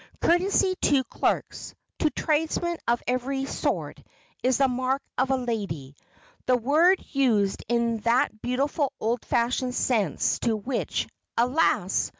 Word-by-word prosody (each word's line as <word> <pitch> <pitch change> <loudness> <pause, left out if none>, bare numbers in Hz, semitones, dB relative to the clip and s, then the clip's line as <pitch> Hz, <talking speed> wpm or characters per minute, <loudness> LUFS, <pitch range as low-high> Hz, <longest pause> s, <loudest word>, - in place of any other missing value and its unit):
Courtesy 375 +2 +3
to 280 -3 +3
clerks, - - -2 0.2
to 310 - +3
tradesmen 325 +3 -1
of 240 0 +1
every 265 +2 -1
sort - - -3 0.4
is 255 -1 +2
the 275 - +4
mark 255 +1 0 0.2
of 260 +1 +1
a 265 - +3
"lady," 195 - -4 0.5
the 250 -1 +4
word 315 +10 +4
used 225 -8 +1
in 235 -1 +1
that 230 -1 +1
beautiful 275 +3 -1
old 230 +1 -1
fashioned 250 +1 0
sense 215 - +1
to 230 -2 +1
which, 240 +4 -2 0.3
alas! 250 +7 +2
255 Hz, 130 wpm, -26 LUFS, 235-280 Hz, 0.5 s, the